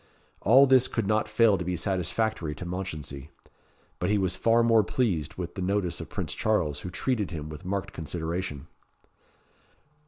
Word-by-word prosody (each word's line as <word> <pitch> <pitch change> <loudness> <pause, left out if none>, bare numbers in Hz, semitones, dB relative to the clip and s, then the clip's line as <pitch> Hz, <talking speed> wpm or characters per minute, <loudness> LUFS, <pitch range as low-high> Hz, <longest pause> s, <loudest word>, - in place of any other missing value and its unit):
All 130 +6 +7
this 130 -1 +5
could 115 - -2
not 110 +1 +1
fail 110 -3 +4
to - - -2
be 90 +1 -2
satisfactory 90 -1 -1
to 90 - -7
Mounchensey; 75 -6 -5 0.7
but 90 - 0
he 105 - +3
was 95 -2 0
far 115 +1 +3
more 115 -2 +5
pleased 85 - -1
with 90 -2 -5
the 95 - -5
notice 95 -1 -1
of - - -8
Prince - - -3
Charles, 80 -10 0
who 90 - -6
treated 105 +3 -1
him 75 -3 -6
with 75 +3 -9
marked 100 +1 -3
consideration. 80 -1 -4
95 Hz, 165 wpm, -27 LUFS, 85-110 Hz, 0.7 s, All